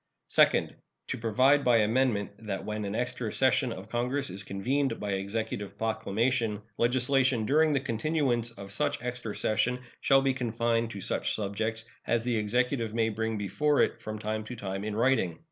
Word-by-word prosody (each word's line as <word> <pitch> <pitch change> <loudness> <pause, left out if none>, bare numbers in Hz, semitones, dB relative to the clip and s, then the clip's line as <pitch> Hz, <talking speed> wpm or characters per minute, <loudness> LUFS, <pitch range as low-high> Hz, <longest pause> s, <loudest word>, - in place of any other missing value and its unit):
Second. - - +3 0.3
To - - -2
provide 130 +6 +3
by 125 -3 +5
amendment 110 -2 +1 0.2
that 95 -2 -3
when 105 -1 -3
an 100 +1 -3
extra 120 -2 -2
session 130 -1 +2
of 100 -3 -7
Congress 125 0 -1
is 95 +2 -5
convened 130 +9 -1
by 105 -1 -3
Executive 100 0 -3
proclamation 110 0 0 0.2
legislation 125 0 +2
during 155 +5 +4
the 140 - +2
continuance 125 -1 0
of 100 -4 -10
such - - 0
extra 125 -4 -4
session 125 +3 +1 0.2
shall 135 -1 +4
be 135 -1 +2
confined 115 -2 0
to 100 -4 -7
such - - -1
subjects 110 +2 -3 0.2
as 120 -1 +1
the 120 -1 0
Executive 115 +1 0
may 115 -1 +2
bring 110 0 -2
before 145 +9 +1
it - - 0
from 110 0 -5
time 110 0 -3
to 125 - -7
time 95 -3 -4
in 105 0 -3
writing. 115 -8 +1
115 Hz, 170 wpm, -29 LUFS, 105-125 Hz, 0.3 s, by